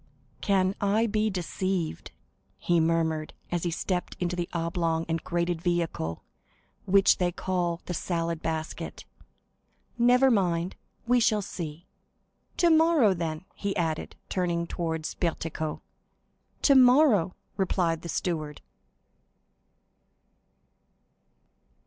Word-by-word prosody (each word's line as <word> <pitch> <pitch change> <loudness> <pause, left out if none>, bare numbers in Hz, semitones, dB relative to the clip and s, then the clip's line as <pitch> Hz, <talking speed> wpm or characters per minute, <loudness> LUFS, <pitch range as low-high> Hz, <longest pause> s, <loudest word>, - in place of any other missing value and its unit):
"Can 190 -2 +2
I 205 +3 +2
be 215 0 +1
deceived?" 185 - -3 0.5
he 175 -1 +2
murmured, 160 -1 0 0.2
as 175 -1 0
he 175 - -1
stepped 180 +2 -3
into 180 0 -1
the 175 -1 -3
oblong 165 -1 -1
and 165 0 -2
grated 170 -1 -1
vehicle 170 - -1 0.6
which 195 +1 +5
they 180 -1 +1
call 175 -2 -2
"the 180 - -4
salad 165 -1 -2
basket." 160 -1 -4 0.9
"Never 250 +2 +5
mind, 180 -4 +1 0.3
we 245 +1 +4
shall 215 -3 +2
see! 165 -2 -6 0.7
Tomorrow, 320 - +5
then!" 165 -1 -4
he 200 0 -3
added, 160 -3 -2
turning 170 -2 -1
towards 160 -2 -3
Bertuccio. 160 -2 -3 0.8
"Tomorrow!" 255 - +5 0.2
replied 175 -4 0
the 170 - -7
steward. 155 -4 -2
175 Hz, 100 wpm, -27 LUFS, 165-195 Hz, 0.9 s, which